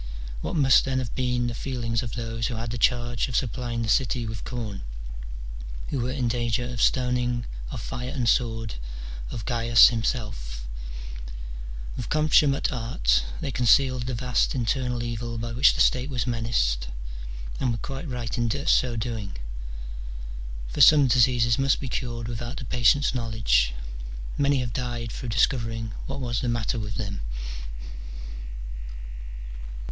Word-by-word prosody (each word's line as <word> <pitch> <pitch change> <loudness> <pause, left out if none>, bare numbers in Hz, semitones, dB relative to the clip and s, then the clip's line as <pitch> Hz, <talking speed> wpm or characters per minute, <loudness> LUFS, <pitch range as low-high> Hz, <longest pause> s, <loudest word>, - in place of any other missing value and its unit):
What - - -2
must 135 -4 +6
then 135 -1 0
have 125 -3 -2
been 125 -1 +1
the 120 - -1
feelings 115 -2 -1
of 115 -4 -5
those 115 -1 -2
who 120 - -3
had 115 0 -3
the 120 - -3
charge 120 0 +2
of 125 - -4
supplying 120 -1 0
the - - -2
city 125 +1 +2
with 110 -1 -5
corn, 110 -6 -4 1.1
who 140 - -1
were 120 +1 0
in 130 -2 0
danger 120 0 0
of 120 -1 -3
stoning, 125 -1 +2 0.2
of - - -5
fire 125 +1 -4
and 130 -4 -1
sword, 115 -2 +2 0.6
of 110 - -5
Gains 120 -1 +7
himself? 105 - -2 1.3
"With 120 - -4
consummate 150 -2 +4
art 65 - +2 0.2
they 135 - -2
concealed 125 0 +4
the 130 - -1
vast 125 +2 +1
internal 125 0 0
evil 120 0 -3
by 115 +1 -3
which 125 +4 +5
the - - +2
state 130 +2 +3
was 125 -3 -1
menaced, 110 - +1 0.7
and 130 - +1
were 115 - 0
quite 135 +6 -5
right 120 -2 -3
in 120 -1 +2 0.2
so 125 -6 +4
doing; 110 - -3 1.3
for - - -1
some 150 -2 +9
diseases 120 -1 +4
must 135 0 +3
be 135 - -4
cured 120 -2 -3
without 120 +4 -4
the 120 - -5
patient's 125 +6 +4
knowledge: 110 - +2 0.6
many 140 -1 +3
have 120 -2 -3
died 120 -3 -3
through 125 - -5
discovering 115 -1 +1 0.2
what 135 +1 -4
was 120 -3 -1
the 125 - 0
matter 120 0 0
with 105 -1 -4
them. 100 - -3
120 Hz, 150 wpm, -26 LUFS, 115-125 Hz, 1.3 s, some